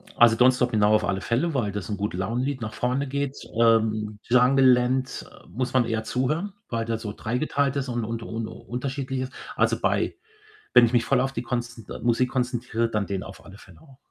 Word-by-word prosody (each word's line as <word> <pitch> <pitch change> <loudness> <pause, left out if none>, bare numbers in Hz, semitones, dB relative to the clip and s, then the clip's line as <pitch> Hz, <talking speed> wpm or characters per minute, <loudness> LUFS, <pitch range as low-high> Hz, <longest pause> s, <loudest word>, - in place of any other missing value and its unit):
Also, 115 -1 +6
„Don't 125 +2 +6
stop“ 125 -1 0
genau 105 -1 +3
auf 105 - +2
alle 95 +1 -1
Fälle, 130 +9 0
weil 110 -7 0
das 100 -2 -4
ist - - -10
ein 100 - -2
Gute-Laune-Lied, 115 +7 -2
nach 110 -1 -4
vorne 130 +3 -1
geht. 140 0 -3 0.2
Ähm, 110 -2 +2
„Jungle 125 +2 +4
Land“, 125 +1 +2
äh, - - -18
muss 125 +6 -3
man 125 -2 +4
eher 110 -1 -2
zuhören, 150 - -1 0.2
weil 115 -1 -2
der 115 -1 -1
so 105 -2 -6
dreigeteilt 140 +4 -1
ist 135 -2 -2
und 120 -2 -2
und 115 0 -4
un 115 -1 -4
unterschiedlich 130 +2 -4
ist. 130 +1 -5 0.2
Also - - +2
bei - - 0 0.6
wenn 120 - +10
ich 115 - -3
mich 120 -2 +3
voll 135 -2 +2
auf 135 +1 -1
die 120 - -3
kons 120 -2 -4 0.2
Musik 120 +1 +2
konzentriere, 120 -2 -1
dann 105 -2 -1
den 95 -1 -3
auf 95 - -11
alle 100 +1 -13
Fälle 90 -3 -17
auch. 135 -4 -18
120 Hz, 215 wpm, -25 LUFS, 110-130 Hz, 0.6 s, wenn